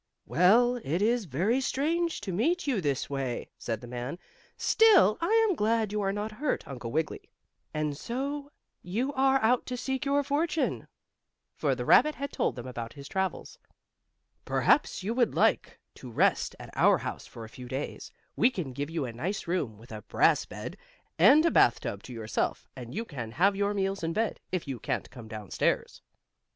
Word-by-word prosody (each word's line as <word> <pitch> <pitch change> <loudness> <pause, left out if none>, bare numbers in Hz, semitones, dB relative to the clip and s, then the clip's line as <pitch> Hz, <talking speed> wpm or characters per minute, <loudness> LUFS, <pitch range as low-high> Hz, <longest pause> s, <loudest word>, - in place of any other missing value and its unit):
"Well, 235 +8 +4
it 170 - -2
is 225 +2 +2
very 185 - +1
strange 325 +5 0
to 200 -2 -4
meet 320 - +1
you 255 -9 0
this 140 -4 -1
way," 135 -3 -3
said 115 -3 -3
the 120 - -9
man. 125 +6 -5 0.4
"Still, 390 - +5
I 445 +6 +4
am 390 - +1
glad 220 -3 +1
you 210 0 -1
are 195 -1 +1
not 205 +2 -3
hurt, 255 +6 -2
Uncle 120 -4 -6
Wiggily. 155 +3 -2 0.4
And 155 -1 -2
so 280 - -4 0.3
you 235 +10 -2
are 270 0 +3
out 245 +3 +2
seeking 265 +2 -2
your 285 0 +3
fortune," 305 +3 -1 0.7
for - - 0
the - - -4
rabbit 305 0 +5
had 280 +1 -5
told - - 0
them 120 - -7
about 120 -2 -6
his 140 -1 -10
travels. 190 +2 -3 0.8
"Perhaps 295 - +2
you 215 +4 -1
would 240 -2 +1
like - - +2 0.2
to - - -11
rest - - +1
at - - -11
our - - +5
house - - -6
for 115 - -9
a 110 - -15
few 125 -1 -8
days. 130 +4 -5 0.2
We 245 - +4
can 170 - -5
give 145 +3 -4
you 165 -4 -2
a 120 - -6
nice 180 - -3
room, 155 - -2
with 115 +3 -15
a 110 -1 -6
brass - - +2
bed, - - -7 0.4
and 305 +4 +7
a 335 - +4
bath 120 - +5
tub 100 - -4
to - - -9
yourself, 110 -2 -2
and 120 +2 -8
you 225 +3 -2
can 120 - -7
have 195 +10 +3
your 200 +1 0
meals 195 -1 -1
in 165 0 -1
bed, 220 +2 -1
if 185 -4 -2
you 135 -3 -4
can't - - -3
come 120 -3 -10
down 110 -3 -8
stairs." - - 0
195 Hz, 190 wpm, -29 LUFS, -, 0.8 s, and